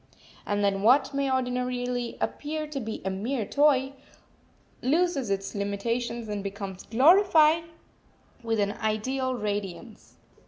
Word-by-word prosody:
And 205 0 0
then 195 -1 +1
what 260 +6 +4
may 275 -1 0
ordinarily 250 -1 -2
appear 305 +1 -3
to 300 -2 -5
be 225 -3 -6
a 190 - 0
mere 220 +5 -2
toy 275 +1 +2 0.9
loses 295 - +1
its 195 0 -2
limitations 230 +4 -2
and 205 -1 -4
becomes 195 -1 -6
glorified 320 - +5 0.8
with 225 -2 -1
an 200 0 +1
ideal 255 +5 -1
radiance. 210 0 -5
245 Hz, 120 wpm, -27 LUFS, 205-275 Hz, 0.9 s, glorified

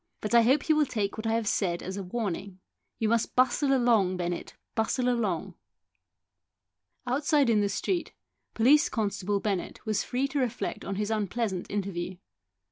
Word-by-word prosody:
But 215 - -4
I 235 - +8
hope 265 +5 +3
you 315 - +4
will 300 -2 +3
take 205 -4 -2
what 220 0 -4
I 225 - +1
have 225 -2 0
said 175 -4 0
as 190 +1 -5
a 200 - -4
warning. 195 -1 -4 0.4
You 225 - 0
must 230 +1 +1
bustle 260 +2 +3
along, 230 -8 +3
Bennett, 175 -1 -4 0.2
bustle 240 +3 0
along." 220 -9 0 1.5
Outside 280 0 +2
in 210 -2 +3
the 200 - +1
street, 350 - -2 0.4
Police 290 +9 +5
constable 205 -2 -1
Bennett 195 -3 -3
was 215 -2 0
free 260 +3 -1
to 280 - -1
reflect 245 -2 -2
on 195 - -4
his 210 +2 -2
unpleasant 210 -2 -2
interview. 185 -3 -3
220 Hz, 165 wpm, -28 LUFS, 195-250 Hz, 1.5 s, I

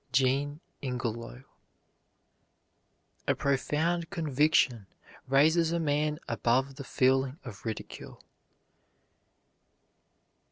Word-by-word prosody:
JEAN 135 +4 +1 0.2
INGELOW. 120 -1 -4 1.8
A - - +3
profound 160 +5 0
conviction 150 - +2 0.4
raises 160 +5 +4
a 170 - 0
man 150 -1 0
above 130 +3 +1
the 140 - -6
feeling 130 +1 +2
of 110 -6 -9
ridicule. 110 -2 -6
140 Hz, 75 wpm, -29 LUFS, 130-155 Hz, 1.8 s, raises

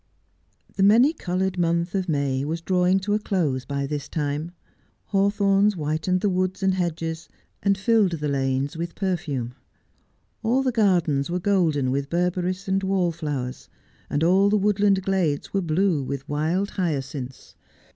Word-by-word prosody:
The - - 0
many 230 +10 +6
coloured 185 - -2
month 170 +1 0
of 190 -2 -1
May 140 -3 0
was 160 +3 -2
drawing 180 +2 +2
to 205 +2 -1
a 210 - +2
close 155 -11 -1
by 140 +1 -2
this 145 0 -4
time. 150 +1 -2 0.6
Hawthorns 200 0 +2
whitened 160 +3 -1
the 205 - +2
woods 185 +1 -1
and 190 0 +3
hedges, 165 -2 -3 0.3
and 200 -1 +2
filled 205 -2 +2
the 150 -2 -2
lanes 135 +1 -1
with 170 +1 -5
perfume. 155 - -2 0.9
All 245 +4 +1
the 260 - +1
gardens 175 - +2
were 180 +1 -1
golden 170 -9 +1
with 140 +1 -2
beiberis 180 +2 -1
and 190 0 +1
wallflowers, 165 -9 -2 0.4
and 145 - 0
all 190 +4 +4
the 210 - +3
woodland 200 -1 +2
glades 185 -7 -1
were 195 - +1
blue 170 -1 +1
with 135 0 -5
wild 160 +7 -1
hyacinths. 140 -7 -4
175 Hz, 150 wpm, -24 LUFS, 150-195 Hz, 0.9 s, many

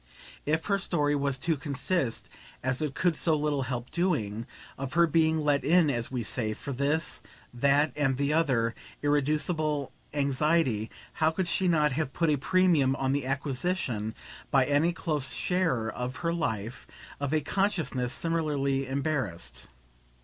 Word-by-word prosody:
If 160 +2 +1
her 200 -1 +1
story 145 -6 +1
was 140 -1 0
to 160 +5 0
consist, 140 0 -1 0.4
as 130 +1 0
it 150 -3 -2
could 175 -2 +2
so 160 +1 +2
little 150 -2 0
help 125 -1 -4
doing, 115 - -1 0.3
of 135 -1 -5
her 170 +1 +5
being 160 -1 +2
let 145 -2 +2
in, 160 +1 +4
as 120 -3 -2
we 125 -3 -2
say, 110 0 -2
for 140 - -6
this, 145 +5 -1 0.3
that 140 +4 +3
and 135 -3 +1
the 140 +2 +1
other 130 -8 +2 0.3
irreducible 150 0 +1 0.2
anxiety, 140 -5 +1 0.2
how 155 - +2
could 175 +2 -1
she 185 +2 +1
not 155 -4 +3
have 135 0 -2
put 165 -3 +2
a 145 - +2
premium 155 -4 +3
on 135 -1 0
the 140 -2 -1
acquisition, 135 - -2 0.3
by 135 -2 +4
any 145 +5 +3
close 155 -6 -2
sharer 165 -12 0
of 125 +2 -4
her 165 - +2
life, 115 -7 -3 0.3
of 140 -1 -2
a 155 - +3
consciousness 155 -8 0
similarly 140 -4 0
embarrassed? 135 - -3
145 Hz, 155 wpm, -28 LUFS, 130-160 Hz, 0.4 s, her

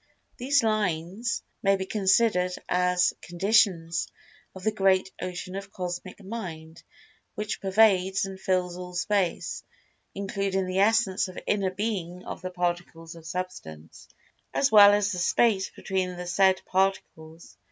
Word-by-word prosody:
These 270 +1 +2
"lines" 205 0 -1 0.2
may 195 0 +3
be 190 -1 -4
considered 190 -2 +2
as 180 0 +2
"conditions" 175 -3 +1 0.5
of 190 - -10
the 215 - +2
great 190 -2 +2
Ocean 180 0 -5
of 195 0 -7
Cosmic 180 +2 -6
Mind 170 -6 -7 0.5
which 210 0 -4
pervades 195 -1 +3
and 190 -1 -8
fills 180 -2 -1
all 180 0 -8
Space, 190 -1 -1 0.5
including 195 -1 -2
the 185 +1 -2
essence 200 -2 +2
or 185 - -11
inner 200 -2 +1
being 185 -3 -4
of - - -7
the 185 - -4
Particles 175 -2 -3
of 165 -1 -12
Substance, 155 - -7 0.5
as 275 - +2
well 205 -2 +9
as 205 0 +1
the 180 - -3
space 190 +2 +2
between 185 -1 -3
the 180 - -6
said 190 +2 +2
Particles. 185 -4 -2
190 Hz, 135 wpm, -26 LUFS, 180-200 Hz, 0.5 s, well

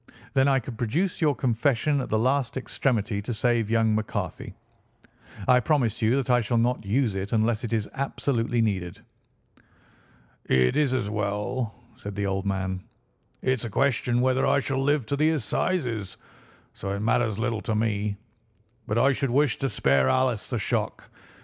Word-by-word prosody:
Then 135 0 +4
I 135 -1 +4
could 120 -2 -6
produce 165 - -1
your 150 -3 +3
confession 135 +4 +1
at - - -5
the 110 - +1
last 130 +2 +1
extremity 115 -6 -1
to 115 +3 -4
save 115 -1 +1
young 115 -1 +3
McCarthy. 110 0 -3 0.9
I 125 -1 +6
promise 125 -4 +1
you 115 +3 +3
that 135 -1 -1
I 120 0 +4
shall 115 +1 0
not 120 +1 +1
use 110 +2 +1
it 95 +1 -4
unless 110 +1 +1
it 120 - -4
is 110 -3 0
absolutely 120 -4 0
needed." 95 -5 -2 1.5
"It's 65 - +3
as 120 -6 0
well," 105 +3 -2 0.2
said 105 -6 -7
the 100 0 -1
old 95 0 -1
man; 95 -1 -2 0.6
"it's 130 -2 0
a - - -4
question 125 0 +1
whether 130 +1 +2
I - - +4
shall 135 -1 -1
live 145 -2 +1
to 140 - -1
the 155 +2 +3
Assizes, 120 - -1 0.6
so 100 - -6
it - - -4
matters 115 -1 +1
little 115 -1 -1
to 110 - -2
me, 105 -2 -1 0.7
but 105 - -1
I 135 +3 +5
should 135 0 -1
wish 135 0 +2
to 135 - 0
spare 70 - +2
Alice 125 - +1
the - - -2
shock. - - -2
115 Hz, 170 wpm, -26 LUFS, 105-130 Hz, 1.5 s, I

